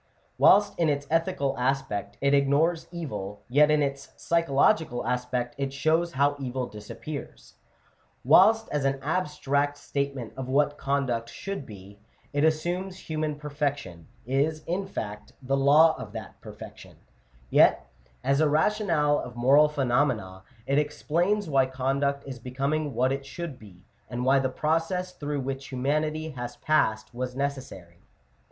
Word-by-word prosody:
Whilst 205 -1 +5
in 165 -2 +3
its 145 -1 -1
ethical 165 -4 0
aspect 130 -5 -2
it 140 +1 +3
ignores 155 +4 +2
evil, 120 - -6
yet 150 +4 +4
in 150 -1 +3
its 140 -1 -4
psychological 160 - +1
aspect 125 0 -2
it 135 -1 -1
shows 160 +5 +1
how 140 +2 +2
evil 130 -1 -3
disappears. 120 +7 -9 0.7
Whilst, 225 +1 +5
as 150 -2 -1
an 135 0 0
abstract 145 -3 0
statement 140 -5 -4
of 130 -1 -5
what 145 +2 +1
conduct 135 -4 -1
should 195 -4 -6
be, 100 -1 -12 0.3
it 145 +1 +1
assumes 175 +4 0
human 155 -3 -3
perfection 145 - -4
— - - -31
is, 145 +5 0
in 190 +3 -2
fact, 105 - -6
the 135 0 -1
law 150 +4 +5
of 105 - -8
that 110 -4 -9
perfection - - -11 0.3
— - - -31
yet, - - +5 0.4
as 140 +2 +2
a 155 - +4
rationale 160 -3 +2
of 120 - -7
moral 140 +5 +5
phenomena, 125 -9 0 0.2
it 140 +2 +2
explains 170 +7 0
why 135 -3 +3
conduct 135 +2 -1
is 130 -3 -7
becoming 140 +4 -2
what 130 +1 +2
it 135 0 -2
should 135 0 -7
be, 95 -4 -16 0.2
and 125 0 -3
why 135 +1 +5
the 130 -1 0
process 165 +6 -1
through 145 -1 -3
which 135 +1 -5
humanity 155 +4 -1
has 120 -3 -6
passed 110 -9 +1
was 125 +1 -4
necessary. 130 -12 -5
140 Hz, 145 wpm, -27 LUFS, 130-155 Hz, 0.7 s, Whilst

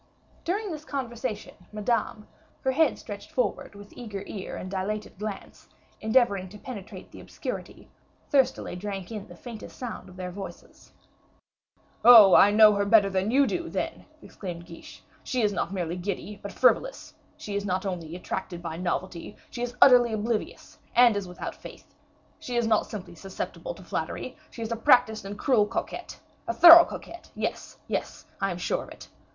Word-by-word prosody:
During 405 +3 -2
this 305 -1 -6
conversation, 250 -5 -5 0.2
Madame, 215 0 -2 0.3
her 265 - +1
head 315 +4 +2
stretched - - -9
forward - - -2
with 205 0 -13
eager 210 -5 -7
ear 195 -2 -6
and 185 - -7
dilated 200 +1 -4
glance, 210 -1 -7 0.3
endeavoring 220 -5 +2
to 210 - -11
penetrate 210 -4 -9
the - - -12
obscurity, - - -7 0.4
thirstily 270 - +1
drank 195 0 -6
in 210 -3 -6
the 175 - -12
faintest 230 +3 -10
sound 245 -3 -7
of 180 - -14
their 180 -1 -6
voices. 195 +1 -10 1.1
"Oh, 220 -6 +10
I 200 - +8
know 210 0 +7
her 200 0 0
better 200 -1 +5
than 190 +2 0
you 275 +4 +4
do, 345 +4 -3
then!" - - -4 0.2
exclaimed 175 -3 -8
Guiche. 165 - -13 0.2
"She 250 -3 -1
is 205 -1 +2
not 185 - -2
merely 175 -3 -3
giddy, 200 +2 -5
but 200 - -7
frivolous; - - +1 0.2
she 205 - -6
is 200 - -1
not 185 0 -2
only 170 -4 -4
attracted 180 -1 -5
by 165 -2 -6
novelty, 180 +1 -4 0.2
she 240 - -6
is 245 0 -3
utterly 245 -3 +6
oblivious, 220 +1 -3 0.2
and 240 -2 +6
is 200 -2 -3
without 180 - -6
faith; - - -13 0.5
she 245 - -6
is 240 -1 +2
not 220 -1 +2
simply 185 -5 -8
susceptible 195 - -6
to - - -13
flattery, - - -4
she 230 - -7
is 225 - -5
a - - 0
practiced 220 -2 +3
and 200 +1 -6
cruel 220 -5 +3
coquette. 230 - -5 0.3
A 345 - 0
thorough 340 0 +11
coquette! 345 - -10
yes, - - -4
yes, - - -4 0.2
I 195 - +1
am 175 - -4
sure 175 - -1
of - - -14
it. - - -12
210 Hz, 175 wpm, -27 LUFS, 190-240 Hz, 1.1 s, thorough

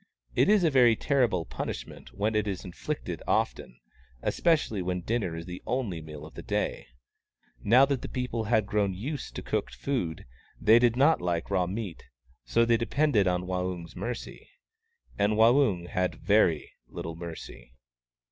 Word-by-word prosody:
It - - +3
is 210 -3 +5
a 165 - +3
very 125 -4 +6
terrible 120 - +1
punishment - - -6
when 105 +2 -1
it 105 -1 +1
is 95 -2 -4
inflicted 90 - -5
often, - - -1 0.4
especially 150 - +1
when 90 0 -2
dinner 105 -4 -1
is 80 0 -6
the 90 0 -7
only 110 -10 -2
meal 75 -1 -9
of 80 - -12
the - - -8
day. - - -2 0.8
Now 125 +6 +6
that 140 -2 -1
the - - -6
people 125 -3 -3
had 110 -1 +2
grown 100 -2 0
used 135 +10 -5
to - - -5
cooked - - -2
food, 105 - -3 0.3
they 110 +2 +6
did 120 -1 +3
not 140 - +4
like 85 +1 -2
raw 90 -2 +2
meat; 100 -2 -5 0.4
so 115 - +3
they 115 0 +3
depended 115 -2 +2
on 90 0 0
Waung's 90 -2 -3
mercy. 120 0 -6 0.7
And 100 +1 +3
Waung 110 -5 +4
had 90 0 -1
very 100 -7 +2 0.2
little 80 0 -6
mercy. 80 -7 -9
105 Hz, 160 wpm, -28 LUFS, 90-120 Hz, 0.8 s, very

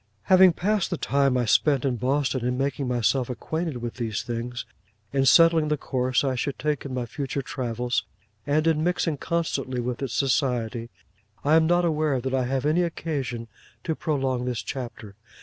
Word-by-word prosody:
Having 185 +2 +6
passed 205 +3 0
the 175 - -2
time 140 -3 +2
I 125 - +1
spent 140 +4 +3
in 130 -3 0
Boston, 130 +1 0
in 125 +1 0
making 135 0 -1
myself 125 +1 +1
acquainted 155 0 -3
with 120 0 -5
these 115 -4 -2
things, 120 +1 -4 0.5
in 135 -1 +2
settling 165 +5 +6
the 150 0 +1
course 130 -1 0
I 135 -2 +1
should 130 +2 -2
take 150 0 -2
in 135 - -5
my 125 -1 -2
future 135 +2 -4
travels, 125 -1 -2 0.4
and 155 +2 +2
in 160 -1 +2
mixing 170 -3 0
constantly 135 -6 -2
with 120 +1 -3
its 130 -4 -3
society, 125 -4 0 0.5
I 150 - +3
am 160 0 +5
not 175 +1 +3
aware 155 -4 +1
that 130 +1 -3
I 130 -1 +1
have 130 +1 -1
any 155 +4 +3
occasion 140 -9 -3 0.4
to 160 - -1
prolong 135 -5 -1
this 125 -2 -2
chapter. 120 -5 -6
135 Hz, 180 wpm, -25 LUFS, 125-155 Hz, 0.5 s, Having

